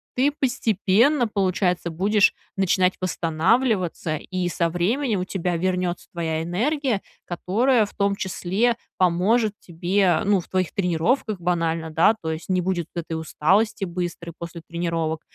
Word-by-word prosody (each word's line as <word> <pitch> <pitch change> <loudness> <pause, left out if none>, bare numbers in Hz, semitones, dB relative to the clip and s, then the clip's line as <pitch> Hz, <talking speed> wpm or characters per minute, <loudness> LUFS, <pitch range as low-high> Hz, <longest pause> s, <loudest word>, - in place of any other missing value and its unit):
ты 275 +3 +2
постепенно, 240 +1 +2
получается, 185 -3 0
будешь 200 +5 +3 0.2
начинать 185 -1 +2
восстанавливаться. 180 - 0
И 185 +1 -3
со 170 0 0
временем 205 - 0
у - - -2
тебя 180 -2 -2
вернется 180 0 -1
твоя 160 -2 -2
энергия, 235 - 0 0.2
которая, 215 +7 +2
в - - -13
том 200 0 +1
числе, 190 +6 0 0.2
поможет 195 +5 +2
тебе, 175 0 +1
ну, 200 -2 +3
в - - -18
твоих 185 -2 -1
тренировках 195 +4 0
банально, 165 -2 -1
да. 165 +8 +4
То 160 -1 -2
есть 160 +3 -8
не 185 - +2
будет 175 -2 -1
этой 170 -1 -4
усталости 195 +7 +1
быстрой 175 -1 -5
после 170 0 -8
тренировок. 165 -2 -2
185 Hz, 135 wpm, -23 LUFS, 170-210 Hz, 0.2 s, да